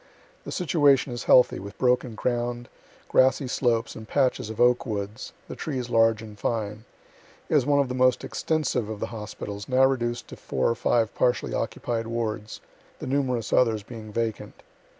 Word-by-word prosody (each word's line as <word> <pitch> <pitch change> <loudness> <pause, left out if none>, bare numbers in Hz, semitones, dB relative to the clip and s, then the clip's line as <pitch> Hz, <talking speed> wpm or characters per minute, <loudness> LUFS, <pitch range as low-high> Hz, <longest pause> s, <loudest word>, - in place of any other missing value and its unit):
The - - -6
situation 145 -7 +3
is 120 - -5
healthy, 125 - +5
with 100 +1 -9
broken 125 -2 +1
ground, 120 +1 -2 0.4
grassy 130 +1 +3
slopes 120 -2 0
and 110 -1 -9
patches 130 -5 +1
of 110 - -7
oak 125 0 +4
woods, 105 -2 -5 0.2
the - - -7
trees 130 -5 -4
large 115 -1 +3
and 105 -1 -11
fine. 110 -1 -3 0.6
It - - -2
was - - +3
one 145 -1 +4
of 140 - +2
the 125 - -4
most 130 0 +3
extensive 135 -8 -1
of 110 -2 -5
the - - -1
hospitals, 105 -1 -7
now 130 +1 +5
reduced 120 -3 -1
to - - -8
four 65 - -1
or 115 - +2
five 115 0 +1
partially 125 -1 +1
occupied 115 -1 -2
wards, 110 -2 -4 0.4
the - - -7
numerous 130 -4 -1
others 110 -4 +3
being 110 -1 -9
vacant. 115 -1 -4
120 Hz, 170 wpm, -26 LUFS, 110-130 Hz, 0.6 s, healthy